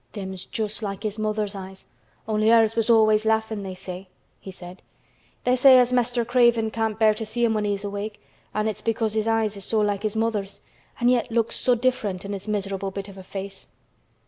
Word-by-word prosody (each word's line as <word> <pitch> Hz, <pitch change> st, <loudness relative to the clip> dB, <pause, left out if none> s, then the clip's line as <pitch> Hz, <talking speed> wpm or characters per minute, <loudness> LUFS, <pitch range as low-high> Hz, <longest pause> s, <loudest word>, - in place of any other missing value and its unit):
"Them's 190 Hz, -3 st, -6 dB
just 215 Hz, 0 st, -1 dB
like 195 Hz, -2 st, -5 dB
his 215 Hz, 0 st, -3 dB
mother's 215 Hz, -1 st, -1 dB
eyes, 190 Hz, -1 st, -9 dB, 0.4 s
only 215 Hz, 0 st, +2 dB
hers 225 Hz, -1 st, +5 dB
was 230 Hz, 0 st, 0 dB
always 215 Hz, -2 st, +5 dB
laughin', 220 Hz, -1 st, 0 dB
they 190 Hz, -1 st, -6 dB
say," 185 Hz, +1 st, -7 dB, 0.3 s
he -, -, -10 dB
said. 180 Hz, 0 st, -10 dB, 0.6 s
"They 250 Hz, 0 st, +3 dB
say 260 Hz, +1 st, +8 dB
as 250 Hz, 0 st, +4 dB
Mr. 245 Hz, -1 st, +1 dB
Craven 235 Hz, -2 st, +3 dB
can't 220 Hz, -1 st, -1 dB
bear 220 Hz, -1 st, +5 dB
to 215 Hz, -, -5 dB
see 235 Hz, +2 st, 0 dB
him 225 Hz, -, +2 dB
when 210 Hz, -1 st, 0 dB
he's 205 Hz, -1 st, -1 dB
awake 205 Hz, +1 st, -5 dB, 0.3 s
an' 215 Hz, +1 st, -1 dB
it's 215 Hz, -, -3 dB
because 225 Hz, -1 st, -1 dB
his 220 Hz, 0 st, 0 dB
eyes 225 Hz, -2 st, +1 dB
is 200 Hz, -, -4 dB
so 220 Hz, -, +1 dB
like 205 Hz, -1 st, 0 dB
his 215 Hz, 0 st, -2 dB
mother's 220 Hz, -3 st, -2 dB, 0.4 s
an' 240 Hz, -, +3 dB
yet 250 Hz, -1 st, +2 dB
looks 230 Hz, -1 st, +1 dB
so 250 Hz, -, +2 dB
different 230 Hz, -7 st, -1 dB
in 200 Hz, -, -4 dB
his 200 Hz, +1 st, -7 dB
miserable 195 Hz, -2 st, -2 dB
bit 200 Hz, +1 st, -6 dB
of 195 Hz, -, -12 dB
a -, -, -8 dB
face." 195 Hz, +1 st, -6 dB
215 Hz, 210 wpm, -24 LUFS, 200-225 Hz, 0.6 s, say